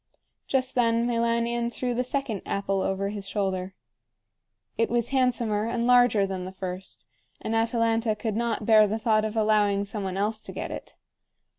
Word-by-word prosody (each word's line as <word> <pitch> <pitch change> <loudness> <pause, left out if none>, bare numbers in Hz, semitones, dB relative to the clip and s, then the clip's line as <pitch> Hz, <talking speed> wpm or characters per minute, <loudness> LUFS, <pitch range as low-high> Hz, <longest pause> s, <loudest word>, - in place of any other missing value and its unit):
Just 265 -1 0
then 230 -1 +2
Meilanion 235 0 0
threw 250 0 -2
the 250 +1 0
second 255 -5 -2
apple 195 -1 -1
over 195 +1 -1
his 200 -1 -5
shoulder. 190 -2 -2 1.0
It 230 - +1
was 235 -1 0
handsomer 235 -5 +1
and 235 0 -1
larger 245 -4 +5
than 190 -1 -4
the 185 - -6
first, 190 0 -7 0.3
and 225 - -3
Atalanta 225 -1 +1
could 215 0 -3
not 230 -2 -1
bear 215 -1 +6
the 215 +2 -1
thought 220 -1 +2
of 215 +1 -4
allowing 210 -2 +2
some 205 0 -5
one 190 0 -3
else 215 +2 0
to - - -9
get - - -5
it. - - -8
220 Hz, 170 wpm, -26 LUFS, 200-235 Hz, 1.0 s, bear